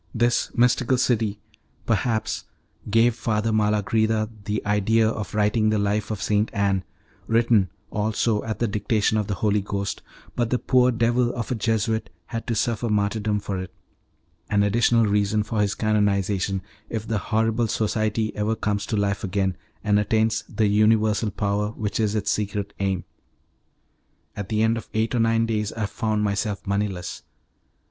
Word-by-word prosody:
This 120 +1 +2
"Mystical 125 +1 +3
City," 110 -5 +1 0.5
perhaps, 110 0 0 0.4
gave 115 +3 +4
Father 110 -1 -1
Malagrida 110 +1 +1 0.2
the 105 0 -2
idea 105 +2 +3
of 110 -2 -3
writing 110 +1 +2
the 110 - +2
life 100 +1 0
of 110 -3 -3
St. 105 +1 +1
Anne, 100 -2 +1 0.4
written, 115 -4 +3 0.2
also, 105 +1 0
at 110 -1 -3
the 120 - 0
dictation 105 +1 +1
of 105 - -2
the 100 - -1
Holy 105 +2 +1
Ghost, 100 0 -3 0.3
but 120 -2 0
the 125 - +2
poor 125 0 +3
devil 120 +1 +2
of 120 +1 -4
a - - +3
Jesuit 110 -1 0 0.2
had 115 +5 -5
to 115 - 0
suffer 115 +1 0
martyrdom 105 0 0
for 100 -2 -4
it 95 -2 -6 0.8
an 100 -1 +3
additional 115 +2 +3
reason 105 0 +1
for 110 0 -1
his 100 -1 0
canonization, 100 -3 +1 0.3
if 110 -1 -4
the 110 -2 0
horrible 115 +3 +1
society 110 0 -1
ever 105 +2 0
comes 105 -2 -2
to 110 - -1
life 100 -1 0
again, 95 -1 0 0.3
and 105 -1 +3
attains 110 +2 +1
the 110 - +1
universal 110 +1 +3
power 100 +1 -1
which 105 -1 -3
is 110 -1 +1
its 105 - 0
secret 100 -1 -2
aim. 95 -3 0 1.3
At 100 -2 -5
the 110 0 +1
end 115 +1 +2
of 115 - -8
eight 110 +2 +1
or 120 - +1
nine 115 0 +3
days 105 -2 -1
I 110 -2 -2
found 110 0 -1
myself 100 0 -1
moneyless. 100 -3 -2
105 Hz, 160 wpm, -24 LUFS, 100-115 Hz, 1.3 s, gave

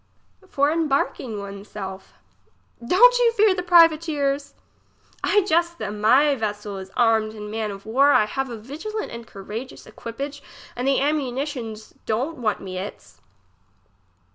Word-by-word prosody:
For 285 -3 +1
embarking 275 -7 -1
one's 200 0 -8
self. 190 -2 -8 0.7
Don't - - +6
you 470 -1 +4
fear 425 -3 +4
the 365 - -2
privateers! 310 -5 +3 0.7
I 415 - +4
jest 340 -2 +1
of - - -27
them; 210 0 -5
my 270 +7 +5
vessel 210 -4 -4
is 190 0 -9
armed 220 -2 +2
in 210 -1 -7
man 220 -1 -2
of 200 -1 -8
war, 270 +6 +4
I 215 - +5
have 270 +5 -3
a 235 - -6
vigilant 315 - -6
and 235 0 -8
courageous 215 +7 -8
equipage, 280 +5 -7 0.3
and 250 +2 -2
the 275 - +3
ammunitions 265 -6 -3
don't 255 +9 -1
want 215 -4 0
me 185 -1 -5
its. 105 - -9
255 Hz, 145 wpm, -23 LUFS, 215-305 Hz, 0.7 s, Don't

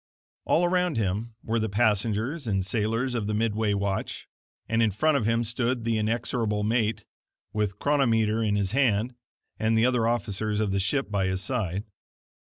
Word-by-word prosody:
All 175 - +3
around 180 -4 +1
him 110 +2 -2
were 115 +1 0
the 110 0 -1
passengers 110 - 0
and 95 -3 0
sailors 115 +5 0
of 115 -4 -2
the 105 - -1
midway 110 -1 +1
watch, 100 -1 -3 0.4
and 115 +2 +1
in 115 - +4
front 155 +10 +1
of 120 -6 +1
him 115 +1 +2
stood 120 +1 -1
the 115 -1 0
inexorable 110 -1 -1
mate, 110 0 0 0.5
with 105 -2 -1
chronometer 115 -6 +2
in 105 -2 +1
his 100 -2 0
hand, 120 -2 +2 0.5
and 110 +1 +2
the 110 - +4
other 125 -3 +2
officers 110 -2 -1
of 105 -2 0
the 100 - +1
ship 135 +5 -1
by 100 -2 +1
his 95 0 -1
side. 100 -5 -2
110 Hz, 175 wpm, -26 LUFS, 105-120 Hz, 0.5 s, in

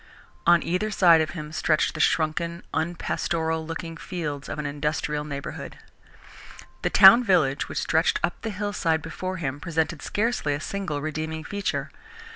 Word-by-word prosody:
On 170 -1 +6
either 180 +5 -1
side 170 -5 +5
of 155 +2 -3
him 150 -1 -6
stretched 155 0 +1
the 155 - -7
shrunken, 170 +2 0
unpastoral 160 -1 -1
looking 165 0 -5
fields 150 -7 -5
of - - -4
an 150 - -4
industrial 150 +1 -2
neighbourhood. 140 -2 -6 1.0
The - - 0
town 210 +5 +8
village 160 - +2
which - - -6
stretched - - +2
up - - -1
the 225 - -3
hillside 195 -6 -1
before 185 +3 -5
him 145 -4 -3
presented 160 -1 -2
scarcely 210 -9 0
a - - -5
single 165 -3 -4
redeeming 155 +1 -4
feature. 200 +2 -3
160 Hz, 150 wpm, -25 LUFS, 150-180 Hz, 1.0 s, town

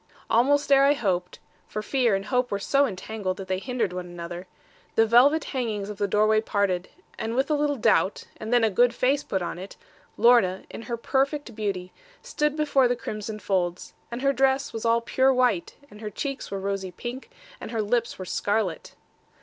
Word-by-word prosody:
Almost 285 +5 +3
ere 275 0 +7
I 280 +1 +5
hoped 185 -9 -2 0.3
for 215 - -5
fear 240 -3 +2
and 195 0 -3
hope 250 +4 0
were 200 - -1
so 275 +8 +2
entangled 190 -2 -4
that 195 - -7
they 185 0 -1
hindered 230 -4 -2
one 180 0 -5
another 175 +1 -7 0.5
the 225 - +5
velvet 260 +8 +5
hangings 215 -6 -3
of 205 - -10
the 205 - +1
doorway 215 +2 +3
parted, 200 -4 -1 0.3
with 255 +6 0
a - - +4
little 295 -1 +1
doubt, 210 -4 +2
and 220 +1 -6
then 245 -1 +4
a 220 - +3
good 240 +5 +3
face 275 +3 +2
put 190 -10 -2
on 175 - -5
it. 190 +2 -9 0.4
Lorna, 230 -6 +4
in - - -7
her 235 - -1
perfect 275 +2 -1
beauty, 195 -4 -3 0.3
stood 300 0 -1
before 285 -4 +3
the 245 - +1
crimson 215 -2 -5
folds, 185 -4 -2 0.2
and 240 +3 -5
her 275 0 +3
dress 270 +1 +1
was 225 0 -5
all 230 0 +3
pure 260 +3 +2
white, 250 -8 +1 0.2
and 210 +1 -13
her 215 - -4
cheeks 275 +5 -5
were 195 - -4
rosy 195 -1 -3
pink, 240 - -7 0.3
and - - -7
her 225 -2 -1
lips 235 +2 0
were 185 - -6
scarlet. 200 -1 -2
225 Hz, 195 wpm, -25 LUFS, 195-260 Hz, 0.5 s, ere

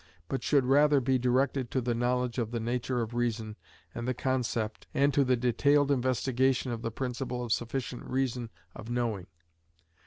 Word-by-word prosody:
but 135 - -2
should 140 -4 +3
rather 145 +2 +5
be 130 0 +1
directed 125 +1 +1
to 130 - 0
the 120 -1 -1
knowledge 125 +1 0
of 115 -2 -1
the 120 0 -3
nature 120 +2 -1
of 115 +1 -7
reason 115 -3 -2 0.4
and 120 +1 -5
the 130 - 0
concept, 125 -4 -2
and 140 +1 +3
to 140 -1 +4
the 130 -1 +2
detailed 140 +4 +3
investigation 130 0 +1
of 115 -1 -4
the 115 - -2
principle 125 +1 -3
of 120 - -5
sufficient 125 +1 -3
reason 125 -3 -1 0.3
of 115 - -9
knowing. 115 -6 -2
125 Hz, 175 wpm, -29 LUFS, 120-130 Hz, 0.4 s, rather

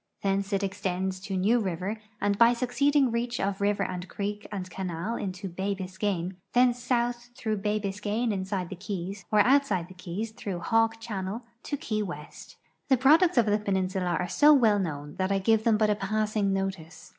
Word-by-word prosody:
Thence 195 0 0
it 200 0 0
extends 190 -1 -2
to 195 0 -4
New 215 +6 +3
river 195 +2 -3 0.2
and 200 0 +1
by 230 +3 +6
succeeding 260 +2 +2
reach 235 +1 -2
of 195 0 -1
river 200 0 +2
and 180 -1 -4
creek 205 +1 -4
and 190 -3 -4
canal 185 +3 -4
into 190 -1 -4
bay 190 +3 -2
Biscayne; 190 -1 -3 0.2
thence 245 0 +4
south 240 -1 -1
through 215 -2 -1
bay 210 +1 0
Biscayne 205 +3 -1
inside 190 -2 -3
the - - -6
keys, 195 0 -5
or 210 -1 +6
outside 215 -8 +2
the - - -11
keys 185 +5 -5
through 200 -4 -5
Hawk 225 +3 +2
channel 210 0 -4 0.2
to 290 - -3
Key 220 -8 -2
M'est. 160 -7 -8 0.3
J'he 265 -3 +4
products 315 +5 +5
of 235 - +6
the 210 0 +2
peninsula 190 -3 0
are 180 - -1
so 295 - +6
well 220 -6 +4
known 150 -5 -4
that 185 +1 0
I 195 - +3
give 220 +3 +2
them 225 -2 +4
but 215 -1 +3
a - - +2
passing 210 0 0
notice. 175 -4 -4
200 Hz, 190 wpm, -28 LUFS, 185-225 Hz, 0.3 s, by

